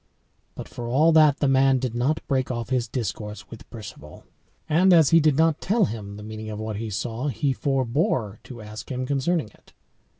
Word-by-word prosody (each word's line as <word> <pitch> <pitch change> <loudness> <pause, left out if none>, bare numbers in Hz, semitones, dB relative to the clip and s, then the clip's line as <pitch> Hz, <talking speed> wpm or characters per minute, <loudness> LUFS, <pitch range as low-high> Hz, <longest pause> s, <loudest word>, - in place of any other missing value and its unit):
But - - -8
for 120 - -7
all 150 +7 +4
that, 155 -3 +5
the 145 - +3
man 135 0 +4
did 125 -2 -3
not 130 +6 -1
break 130 -3 0
off 120 -1 -4
his 125 -2 0
discourse 105 -5 -5
with 115 - -12
Perceval. 110 -4 -11 0.4
And 180 +4 +4
as 160 -4 +5
he 165 - +7
did 150 -3 +2
not 160 -1 +2
tell 210 +1 +2
him 100 -5 -6
the 105 - -9
meaning 110 0 -7
of 105 -1 -6
what 110 -1 -4
he 110 +1 -4
saw, 115 +6 -3
he 140 +1 0
forebore 130 -5 -1
to 120 -4 -10
ask 105 0 -9
him 130 0 -3
concerning 140 0 -1
it. - - -25
130 Hz, 200 wpm, -24 LUFS, 110-150 Hz, 0.4 s, he